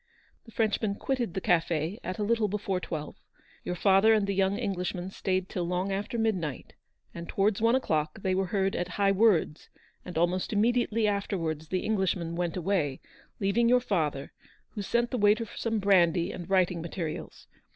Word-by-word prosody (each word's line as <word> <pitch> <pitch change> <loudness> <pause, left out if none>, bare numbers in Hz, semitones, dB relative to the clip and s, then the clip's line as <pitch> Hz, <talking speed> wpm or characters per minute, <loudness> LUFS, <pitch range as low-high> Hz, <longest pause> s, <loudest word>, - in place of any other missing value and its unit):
The 230 - -14
Frenchman 215 -2 0
quitted 240 -6 -2
the 190 - -2
cafe 165 +2 0
at 185 - -4
a 210 - -1
little 225 0 +2
before 200 -2 -2
twelve; 155 -4 -6 0.5
your 180 - -3
father 195 +4 +5
and 210 -2 +1
the 200 - -1
young 195 +1 +1
Englishman 185 -4 -3
stayed 185 -1 -1
till 180 - -3
long 180 +3 -1
after 200 +4 -3
midnight, 190 - -2 0.4
and 170 0 -8
towards 200 +1 +1
one 230 +2 +4
o'clock 155 - -1
they 190 - +1
were 190 0 0
heard 195 +1 0
at 175 - -1
high 200 -1 +3
words, 195 -6 +2 0.3
and 180 -2 -7
almost 175 +2 +1
immediatelv 230 +1 +2
afterwards 175 -7 -2
the 185 +2 -1
Englishman 190 -5 -1
went 175 0 -2
away, 170 -7 0 0.4
leaving 215 +4 +2
your 250 +1 +5
father, 155 - -2 0.4
who 210 - -6
sent 235 +4 0
the 250 - -1
waiter 210 +2 +3
for - - -13
some 225 -1 -1
brandy 175 -4 +3
and 180 0 -8
writing 180 -3 +2
materials. 170 -1 -6
195 Hz, 175 wpm, -28 LUFS, 175-210 Hz, 0.5 s, father